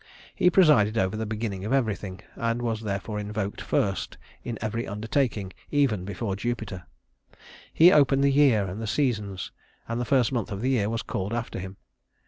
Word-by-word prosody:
He 180 - +4
presided 135 - +5
over 95 0 +1
the 110 0 -3
beginning 105 -3 -3
of 110 - -3
everything, 105 -7 -1
and 115 0 -1
was 115 -2 -1
therefore 105 0 -3
invoked 105 -1 -4
first 95 -2 -1 0.3
in 120 -2 -4
every 110 +2 -3
undertaking 105 -2 -1 0.2
even 130 -11 +1
before 100 +1 -3
Jupiter. 100 -5 -4 0.8
He 170 +3 +7
opened 140 -3 +4
the 140 - +4
year 135 -8 +4
and 95 +4 -5
the 110 - -3
seasons, 105 -6 -1 0.4
and 115 +1 -2
the - - -2
first 130 -1 +3
month 115 -5 -2
of 100 0 -4
the 130 +2 +1
year 105 -5 +1
was 115 -1 -2
called 100 +4 -3
after 120 -4 -4
him. 95 +1 -7
110 Hz, 175 wpm, -26 LUFS, 100-120 Hz, 0.8 s, He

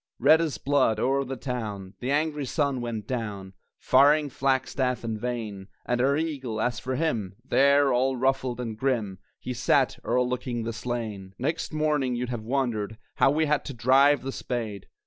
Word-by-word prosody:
Red 155 +6 +5
as 155 -8 -1
blood, 135 -5 +2
o'er 135 +3 +1
the 135 0 -5
town, 110 -7 -5
The 125 - -3
angry 150 -1 0
sun 140 -3 0
went 115 -3 -4
down, 105 -6 -4 0.2
Firing 145 +2 +4
flagstaff 130 -1 0
and 110 -2 -3
vane 110 -6 -4 0.2
And 120 0 0
our 140 +2 +3
eagle, 135 -8 -3
as 120 0 0
for 130 0 -3
him, 115 - -1
There, 140 0 +4
all 130 +2 +2
ruffled 130 -1 0
and 115 -3 -4
grim, 110 -6 -1 0.2
He 125 - -5
sat, 125 +2 +2
o'erlooking 125 -1 -1
the 115 +1 -3
slain! 110 -5 -5
Next 155 +6 -2
morning, 150 -5 0
you'd 120 0 -3
have 120 -3 -3
wondered 110 -3 -2 0.2
How - - +5
we 155 +3 +2
had 150 -1 +1
to 140 - -6
drive 135 +4 +4
the 135 - -3
spade! 115 -7 -4
125 Hz, 170 wpm, -26 LUFS, 115-140 Hz, 0.2 s, Red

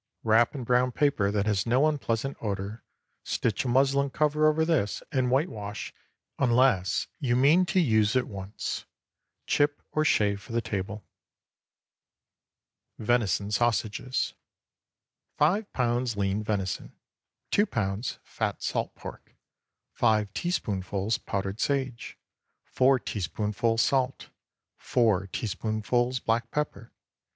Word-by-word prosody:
Wrap 115 +4 +4
in 130 - -4
brown 125 +1 +2
paper 130 -8 +2
that 100 0 0
has 105 0 0
no 130 +5 +4
unpleasant 135 -3 -1
odor, 100 +1 -4 0.4
stitch 110 +2 -1
a - - -1
muslin 135 +2 +3
cover 150 +2 +2
over 155 +1 +3
this, 145 -12 0
and 130 -4 +1
whitewash, 120 - -2 0.5
unless 120 -7 +3
you 120 -5 +1
mean 155 +8 +5
to 185 - +2
use 110 - +3
at 130 - +2
once. 100 +1 -5 0.6
Chip 145 0 +1
or 155 - +1
shave 100 -8 +2
for 115 - -10
the 115 - +2
table. 105 -2 -4 1.9
VENISON 110 -3 +1
SAUSAGES. 120 +2 0 1.0
5 195 +8 +2
lbs. 120 -2 0
lean 100 +1 0
venison. 100 -3 -3 0.6
2 205 +1 +3
lbs. 105 +2 -2
fat - - -3
salt - - -2
pork. - - -10 0.6
5 105 -2 +2
teaspoonfuls 100 - -1
powdered 100 +1 -3
sage. 130 -4 -2 0.5
4 130 +1 +3
teaspoonfuls 105 +3 -1
salt. 135 -1 0 0.5
4 105 -6 +1
teaspoonfuls 110 +5 -1
black 115 0 0
pepper. 150 -5 -3
115 Hz, 115 wpm, -28 LUFS, 105-135 Hz, 1.9 s, mean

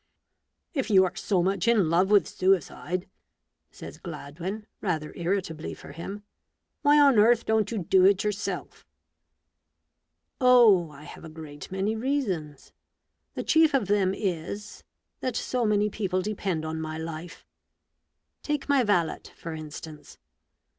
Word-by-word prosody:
" - - -54
If 270 -6 -2
you 190 -3 +6
are 180 - -4
so 185 -4 0
much 195 +2 0
in 220 -7 +4
love 180 +3 +3
with 205 -1 +5
suicide," 185 -1 0 0.6
says - - -11
Gladwin, 170 +6 -6 0.2
rather 155 -3 -2
irritably 170 -3 -3
for - - -12
him, 200 +5 -7 0.3
" - - -55
why 290 0 +5
on 280 -6 +6
earth 235 +2 +4
don't 220 -2 +1
you 230 - -3
do 185 0 +3
it 195 -1 +4
yourself?" 210 -1 -4 0.8
" - - -38
Oh! 230 -9 +6
I 145 0 -13
have - - -11
a 160 - -8
great 155 -1 -10
many 195 +3 -1
reasons. 210 - -3 0.6
The - - -3
chief 320 -2 +4
of 255 -6 +2
them 195 -2 +2
is, 195 +2 -4 0.4
that 255 -3 -3
so 245 -2 -1
many 210 0 +2
people 190 -3 -2
depend 190 -6 -2
on 160 0 -4
my 155 0 -5
life. 160 +1 -7 1.0
Take 295 -2 -2
my 285 -2 +4
valet, 175 -7 +1
for 165 - -7
instance. 155 -1 -9
190 Hz, 145 wpm, -27 LUFS, 165-215 Hz, 1.0 s, you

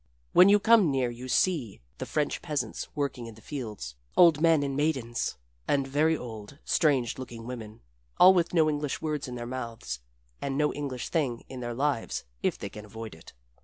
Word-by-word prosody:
When 185 +2 +8
you 205 +1 +6
come 220 -4 +5
near 130 -3 +1
you 120 +2 -8
see 130 - +1 0.2
the - - -4
French 150 -2 -1
peasants 150 -4 -3
working 140 -5 -2
in 115 - -10
the - - -15
fields 105 - -6 0.2
old 165 -4 +7
men 165 -3 +4
and 140 -1 -2
maidens, 135 - -1 0.3
and 140 -1 +1
very 155 +4 +2
old, 110 +1 -9
strange 135 -8 +2
looking 120 -3 -8
women, 115 -3 -8 0.4
all 185 +1 +9
with 175 -2 +1
no 160 -3 +4
English 150 -2 -1
words 150 -3 -2
in 125 - -6
their 120 -1 -5
mouths 115 - -5 0.4
and 135 -1 -2
no 150 0 +2
English 135 -4 -4
thing 135 -8 -1
in 130 - -7
their 120 -1 -4
lives 140 -2 -1 0.2
if - - 0
they - - -5
can 105 - -9
avoid 110 +1 -8
it. 80 - -14
135 Hz, 190 wpm, -28 LUFS, 120-150 Hz, 0.4 s, all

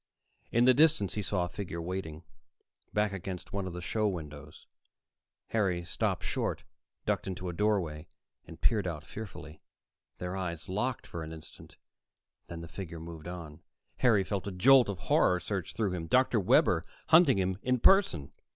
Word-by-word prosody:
In 120 +1 +4
the 130 - +7
distance, 150 - +4
he 105 - -2
saw 95 -2 0
a - - -4
figure 90 -1 -6
waiting, 85 -2 -5 0.7
back 105 -1 +1
against 95 -1 -6
one 100 -1 -2
of 90 - -6
the 90 0 -6
show 110 +3 0
windows. 75 -7 -7 0.8
Harry 90 -6 0
stopped 85 - -1
short, - - -2 0.4
ducked - - -1
into 90 -1 -4
a - - -4
doorway, 90 -6 0 0.4
and - - -11
peered 105 -5 +2
out 75 -4 -4
fearfully. 80 -8 -9 0.6
Their 90 +1 -4
eyes 85 -4 -4
locked 120 +7 -2
for 85 - -6
an 80 0 -6
instant; 80 -1 -12 0.7
then 85 -1 -7
the 85 - -8
figure 85 -1 -7
moved 80 -1 -9
on. 85 -4 -8 0.4
Harry 110 -6 +4
felt 100 0 -3
a - - -3
jolt 125 +6 +6
of 100 - -3
horror 90 +1 +3
surge 95 -3 -4
through 105 -4 0
him. 85 -3 -4
Dr. 125 +3 +3
Webber 95 - +4 0.3
hunting 165 - +6
him 95 0 0
in 125 0 +1
person! 105 - +4
95 Hz, 170 wpm, -30 LUFS, 85-105 Hz, 0.8 s, the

